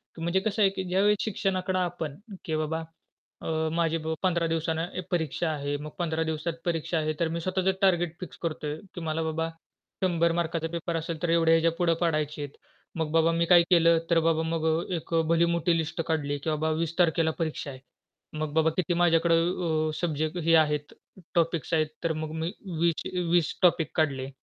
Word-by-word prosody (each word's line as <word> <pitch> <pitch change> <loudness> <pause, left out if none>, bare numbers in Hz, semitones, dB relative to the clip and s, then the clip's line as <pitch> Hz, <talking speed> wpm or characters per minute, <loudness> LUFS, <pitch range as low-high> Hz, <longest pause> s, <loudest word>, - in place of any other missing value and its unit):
की 165 - -9
म्हणजे 170 +3 +1
कसं 215 +2 -1
आहे, 195 - +6
की 190 - -4
ज्यावेळी 195 +3 +3
शिक्षणाकडे 185 -3 -1
आपण, 170 -5 -3 0.3
की 160 - -1
बाबा 155 +1 -2 0.6
अ, - - -6 0.3
माझी 165 -1 +1
ब 160 - -1
15 170 -2 +2
दिवसानं 165 0 -1
ऐ - - -1
परीक्षा 165 -1 0
आहे, 145 -2 -2
मग 150 +1 -7
15 160 -2 0
दिवसात 160 +1 -2
परीक्षा 165 -1 -1
आहे 155 0 0
तर 170 - +2
मी 165 +1 -2
स्वतःच 185 +2 -1
टार्गेट 175 -3 +2
फिक्स 180 - -8
करतोय, 155 -3 -3 0.2
की 175 - -5
मला 160 0 -1
बाबा 160 +1 -1 0.5
100 170 -2 +2
मार्काचा 165 -1 -1
पेपर 170 0 -3
असेल 165 0 -4
तर 175 - +1
एवढ्या 165 -1 +4
ह्याच्या 165 0 +4
पुढे 175 -2 +3
पाडायचे 155 -3 0
आहेत. 145 -1 -8 0.4
मग 155 -2 -1
बाबा 165 +1 +4
मी 170 0 +1
काय 175 0 +7
केलं 170 -1 +6
तर 170 - +5
बाबा 160 -1 +2
मग 165 0 -2
अ, 160 +3 0
एक 165 0 -6
अ, 165 - +4
भली 165 +1 +4
मोठी 170 0 +1
लिस्ट 160 +1 -2
काढली, 145 -3 0
की 145 +3 -4
बाबा 155 +1 0
20 165 0 -2
तारखेला 165 -2 +3
परीक्षा 155 -3 -2
आहे. 130 - -10 0.6
मग 155 -1 -3
बाबा 160 0 +3
किती 180 -1 +1
माझ्याकडे 165 0 +4
अ, 165 -2 0
सब्जेक्ट 155 0 -1
हे 165 +1 +5
आहेत, 150 -1 -3 0.4
टॉपिक्स 165 -3 0
आहेत 155 -1 +3 0.2
तर 165 - +1
मग 155 0 -4
मी 165 +2 -1 0.3
20 170 -1 +3
चे 180 - -3
20 175 -3 +3
टॉपिक 170 -4 +3
काढले. 135 -4 0
165 Hz, 200 wpm, -27 LUFS, 155-170 Hz, 0.6 s, काय